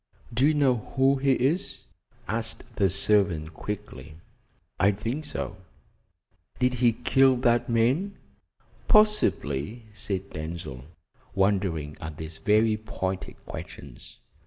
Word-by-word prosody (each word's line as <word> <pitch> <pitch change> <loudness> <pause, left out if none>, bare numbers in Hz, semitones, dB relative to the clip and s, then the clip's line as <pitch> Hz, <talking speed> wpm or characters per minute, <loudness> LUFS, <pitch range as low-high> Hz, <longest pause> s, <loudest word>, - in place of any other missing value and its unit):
"Do 125 +5 +4
you 155 - +3
know 135 -4 +3 0.2
who 135 +1 +4
he 135 0 +3
is?" 155 +11 -1 0.4
asked 110 0 -3
the 100 -2 +3
servant 95 -5 +2
quickly. 105 -4 -7 0.6
"I 95 - +5
think 115 +10 -4
so." 105 -8 -5 1.0
"Did 125 0 +2
he 120 -1 +3
kill 130 +3 +4
that 120 -1 +2
man?" 130 - +1 0.7
"Possibly," 120 - +2
said 100 -2 -4
Denzil, 80 -5 -6 0.5
wondering 95 -7 0
at 80 -1 -6
these 80 0 -7
very 110 +1 +3
pointed 95 -3 -5
questions. 70 -3 -10
110 Hz, 110 wpm, -27 LUFS, 90-130 Hz, 1.0 s, I